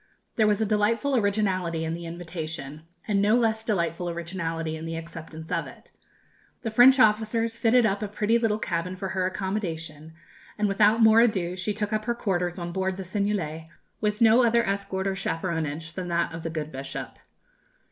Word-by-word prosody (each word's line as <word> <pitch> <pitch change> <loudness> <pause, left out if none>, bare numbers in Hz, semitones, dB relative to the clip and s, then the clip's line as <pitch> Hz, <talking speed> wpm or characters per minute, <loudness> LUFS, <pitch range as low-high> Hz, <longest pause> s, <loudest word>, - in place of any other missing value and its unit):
There 220 -2 +3
was 210 0 +2
a 220 - +2
delightful 220 +6 +1
originality 190 -7 0
in 160 - -2
the 170 0 -6
invitation, 160 -3 -6 0.3
and 205 -2 +2
a - - +3
no 210 +3 +4
less 220 -2 +1
delightful 175 -5 -1
originality 165 -2 -3
in 160 +1 -6
the 165 - -4
acceptance 165 -1 -8
of - - -1
it. - - -15 0.7
The 225 - -2
French 255 +4 +7
officers 225 +1 +2
fitted 235 0 +4
up 200 -1 0
a 210 - -2
pretty 210 +3 +1
little 220 -2 +1
cabin 180 -2 -2
for 190 0 -4
her 185 -1 0
accommodation, 165 -5 -4 0.4
and 210 -1 +1
without 210 +3 +4
more 220 0 +7
ado 190 -7 +1
she 195 +3 -2
took 210 0 -2
up 215 0 -1
her 235 - 0
quarters 180 -6 -1
on 175 -1 -4
board 190 +1 -1
the 190 - -5
Seignelay, 185 -5 -2 0.3
with 210 +1 -1
no 230 +2 +6
other 235 -1 +3
escort 195 -1 -2
or 195 -1 0
chaperonage 165 -4 -3
than 180 +1 -5
that 170 -1 0
of 165 - -6
the 165 - -4
good 155 -1 -4
bishop. 135 +1 -7
190 Hz, 190 wpm, -26 LUFS, 165-215 Hz, 0.7 s, French